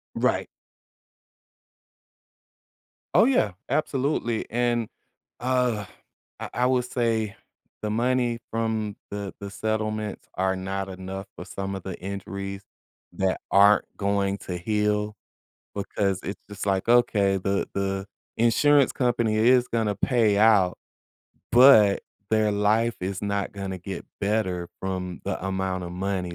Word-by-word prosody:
Right. - - +1 2.7
Oh, - - +7
yeah. 240 - +2 0.2
Absolutely, 135 -6 0
and, 120 -1 0 0.5
ugh, 125 -4 +1 0.5
I - - -5
I 125 - +2
will 130 -1 +2
say 115 -4 -1 0.5
the 105 - -2
money 120 +1 +1
from 110 -2 -1
the 100 -1 -5
the 100 -1 -6
settlements 110 0 -3
are 95 0 0
not 95 +1 -3
enough 95 +1 -6
for - - -7
some 95 0 -5
of 95 - -7
the 95 -2 -6
injuries 100 +1 -5 0.5
that 95 -1 0
aren't 100 +1 +6
going 100 -1 0
to 90 - -5
heal 105 +2 0 0.6
because 100 -1 -1
it's 100 - -5
just 100 0 -6
like, 95 +1 0
"Okay, 100 -5 +4
the 100 +1 -1
the 95 0 -2 0.3
insurance 135 +5 +4
company 120 -4 +1
is 125 +2 +4
gonna 110 -3 0
pay 110 -1 +2
out, 100 -4 +4 0.8
but 120 -6 +7 0.3
their 110 -1 +3
life 110 +3 +2
is 95 +1 -3
not 100 -1 -1
gonna 95 -2 -5
get 95 +2 -6 0.2
better 100 -4 0
from 90 -2 -4
the - - -3
amount 95 -1 -2
of 85 - -6
money," 90 -1 -2
105 Hz, 125 wpm, -25 LUFS, 95-115 Hz, 2.7 s, Oh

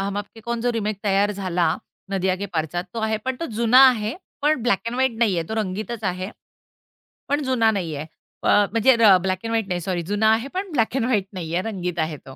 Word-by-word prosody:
हम 200 +1 -2
आपके 205 +2 -8
कॉन 235 +1 -3
जो 245 +1 +1
रिमेक 215 -3 -2
तयार 200 0 +2
झाला, 180 -4 0 0.4
नदिया 190 -1 +1
के 200 +2 -4
पारचा. 170 0 -2
तो 225 +5 -7
आहे, 220 0 0
पण 260 -1 -2
तो 335 - -4
जुना 235 +2 +5
आहे. 225 -2 -1 0.3
पण 295 -5 +2
ब्लॅक 240 -5 +2
एंड 235 - -2
व्हाईट 260 -2 +1
नाहीये. 195 -8 +2
तो 220 - -3
रंगीतच 215 +2 -3
आहे. 185 +1 -2 1.0
पण 290 +1 +1
जुना 245 -4 +2
नाहीये. 160 -7 -3 0.4
अ, - - 0 0.2
म्हणजे 230 +3 +4
र 205 -4 +7
ब्लॅक 185 -1 -1
एंड 225 - -3
व्हाईट 225 -3 0
नाही, 180 -2 -2
सॉरी. 180 0 -2
जुना 220 +1 +3
आहे 230 +5 -1
पण 375 0 -3
ब्लॅक 240 -2 0
एंड 255 - +1
व्हाईट 210 -6 +1
नाहीये, 175 0 -2
रंगीत 180 -5 -4
आहे 155 -1 -1
तो. 135 -1 -13
210 Hz, 220 wpm, -23 LUFS, 185-235 Hz, 1.0 s, र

